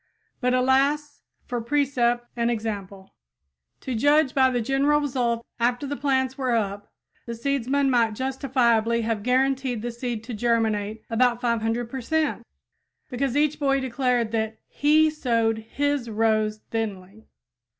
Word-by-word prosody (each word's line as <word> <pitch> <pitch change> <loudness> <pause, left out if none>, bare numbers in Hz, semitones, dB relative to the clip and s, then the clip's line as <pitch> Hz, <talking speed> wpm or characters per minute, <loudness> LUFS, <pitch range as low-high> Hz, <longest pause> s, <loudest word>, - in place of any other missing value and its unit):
But, 250 -1 +1
alas, 280 +3 +1 0.2
for 245 -1 -3
precept 240 -2 +1
and 235 0 0
example! 205 -4 -5 0.7
To 260 - -4
judge 290 +4 +3
by 260 -1 +4
the 250 -1 0
general 275 +5 +2
result 240 -5 -1
after 245 +3 +1
the 285 +1 -3
plants 265 -1 0
were 255 -3 +1
up, 205 -2 -3 0.4
the 235 - -4
seedsman 275 +2 0
might 230 -3 +2
justifiably 240 -3 +1
have 225 -2 -2
guaranteed 255 -1 0
the 240 - -3
seed 235 -2 -4
to 245 +1 -7
germinate 220 -2 0
about 240 +1 +2
500 235 0 -1
per 260 +2 -6
cent, 305 -3 -1 0.6
because 260 +1 -1
each 300 0 +1
boy 275 -2 +2
declared 250 -3 0
that 220 -1 -2
he 310 +2 +3
sowed 230 -6 0
his 275 +2 -2
rows 215 -1 +1
thinly. 210 -2 -5
240 Hz, 140 wpm, -24 LUFS, 225-270 Hz, 0.7 s, by